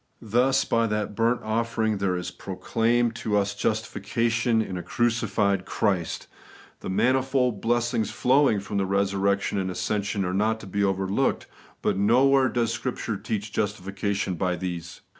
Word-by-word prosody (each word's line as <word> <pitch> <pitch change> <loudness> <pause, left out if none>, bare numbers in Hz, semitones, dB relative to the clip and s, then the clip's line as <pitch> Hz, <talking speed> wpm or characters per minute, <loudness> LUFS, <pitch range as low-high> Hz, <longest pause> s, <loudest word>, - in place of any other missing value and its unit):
Thus, 125 +5 +2
by 115 0 +2
that 105 -1 -2
burnt 115 +3 +1
offering 110 -1 0
there 95 -2 0
is 90 - -4
proclaimed 115 +5 0
to 105 -2 +1
ns 100 0 -1
justification 115 +2 0
in 100 -4 -2
a 90 - -3
crucified 105 -4 0
Christ. 90 -5 -1 0.5
The - - -6
manifold 130 +1 +1
blessings 120 -2 +1
flowing 130 -4 +3
from 100 0 -3
resur 100 0 0
rection 100 0 +1
and 95 - -2
ascension 100 +1 -1
are 90 - -2
not 110 +3 +1
to - - -9
be 100 +1 -1
overlooked; 95 +6 0 0.4
but - - +1
nowhere 130 +5 +4
does 115 -1 0
Scripture 115 -1 -3
teach 105 +1 -4
justification 100 -1 -2
by 90 +1 -1
these. 85 -1 -6
105 Hz, 145 wpm, -25 LUFS, 95-115 Hz, 0.5 s, nowhere